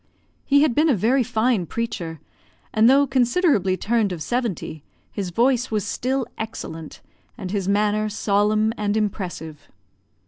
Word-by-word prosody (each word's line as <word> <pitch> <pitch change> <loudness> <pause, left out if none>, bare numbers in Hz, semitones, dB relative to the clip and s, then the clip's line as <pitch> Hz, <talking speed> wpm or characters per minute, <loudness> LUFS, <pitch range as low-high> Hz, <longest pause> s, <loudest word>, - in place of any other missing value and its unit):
He 285 +1 +5
had 300 -6 +2
been 310 +6 +3
a 270 - +4
very 235 +7 +2
fine 225 -5 +1
preacher, 170 -8 -4 0.5
and 220 0 +5
though 280 +2 +5
considerably 250 - +2
turned 220 -1 +1
of 165 -3 -4
seventy, 230 - -3 0.3
his 195 -3 -4
voice 245 +6 +2
was 210 -3 -1
still 260 +1 -1
excellent, 165 -8 -7 0.4
and 185 - -6
his 195 -2 -2
manner 210 +1 +1
solemn 210 +1 +1
and 210 0 0
impressive. 180 -7 -4
215 Hz, 140 wpm, -23 LUFS, 195-245 Hz, 0.5 s, He